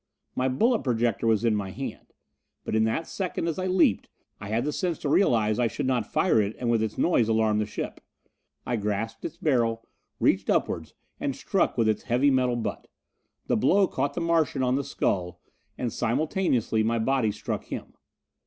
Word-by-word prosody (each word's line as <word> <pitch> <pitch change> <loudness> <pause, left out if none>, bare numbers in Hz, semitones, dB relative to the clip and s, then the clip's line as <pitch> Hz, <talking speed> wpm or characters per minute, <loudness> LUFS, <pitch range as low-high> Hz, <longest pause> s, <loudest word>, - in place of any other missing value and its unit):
My 130 +1 +1
bullet 225 - +2
projector 120 -2 0
was 110 0 +2
in 115 - +3
my 100 -2 -2
hand. - - -7 0.6
But - - -2
in 110 0 +3
that 135 +9 -1
second 180 -2 -3
as 165 +1 -2
I 185 - -1
leaped, 180 - +2 0.3
I 100 - -7
had 115 +5 0
the 150 - -1
sense 175 -1 -1
to 145 - -3
realize 110 - +3
I 120 - +3
should 115 - -3
not 125 -4 0
fire 110 - +3
it 105 +1 -2
and 120 -2 -1
with 115 -2 +2
its 110 -1 -2
noise 120 -10 +2
alarm 110 -1 +2
the 105 - -1
ship. 105 - -5 0.6
I 120 - -1
grasped 105 +2 -3
its 165 - -5
barrel, 115 -6 0 0.3
reached - - +2
upward - - 0 0.3
and - - -2
struck - - 0
with 115 - +3
its 110 - +1
heavy 125 +4 +2
metal 125 -2 +2
butt. 120 - -4 0.6
The - - +1
blow 190 - +4
caught 140 -2 -2
the 175 - -2
Martian 165 -5 +1
on 125 0 +2
the 140 +2 0
skull, 90 -8 -2 0.4
and 120 -3 -2
simultaneously 125 - 0
my 115 +2 +1
body 115 -1 +1
struck - - -4
him. - - -7
120 Hz, 190 wpm, -26 LUFS, 110-140 Hz, 0.6 s, blow